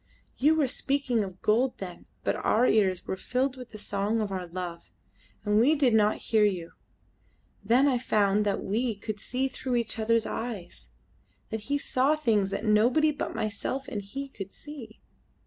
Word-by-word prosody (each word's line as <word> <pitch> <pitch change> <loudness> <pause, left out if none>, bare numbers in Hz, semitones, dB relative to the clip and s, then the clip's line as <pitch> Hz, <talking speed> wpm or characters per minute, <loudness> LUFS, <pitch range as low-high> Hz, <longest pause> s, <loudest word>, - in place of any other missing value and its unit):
You 300 +4 +5
were 310 -3 +3
speaking 265 -3 0
of 190 -1 -9
gold 240 +4 +2
then, 180 -3 -8 0.2
but - - +1
our 230 +3 +2
ears 190 -6 +2
were - - -2
filled 255 +7 -1
with 250 -2 -10
the 215 - -9
song 205 +2 -1
of 210 -2 -2
our 185 -2 -3
love, 175 -1 -6 0.6
and 210 0 +3
we 280 +7 +5
did 270 -5 +3
not 215 -1 +4 0.2
hear 220 -2 +5
you. 180 -5 0 0.9
Then 255 +5 +4
I 255 -3 +2
found 210 -3 +2
that 205 -1 -1
we 225 +3 0
could 205 +1 -5
see 255 +5 -1
through 260 -1 -3
each 230 -2 -1
other's 225 0 +2
eyes: 185 - -5 0.6
that 220 - -3
he 285 - +2
saw 280 +1 +2
things 220 -10 +1
that 215 - -3
nobody 240 +9 +4
but 290 - -4
myself 220 +5 -3
and 210 - -3
he 270 +8 -6
could 195 -7 -8
see. 270 -8 -10
220 Hz, 180 wpm, -28 LUFS, 200-260 Hz, 0.9 s, You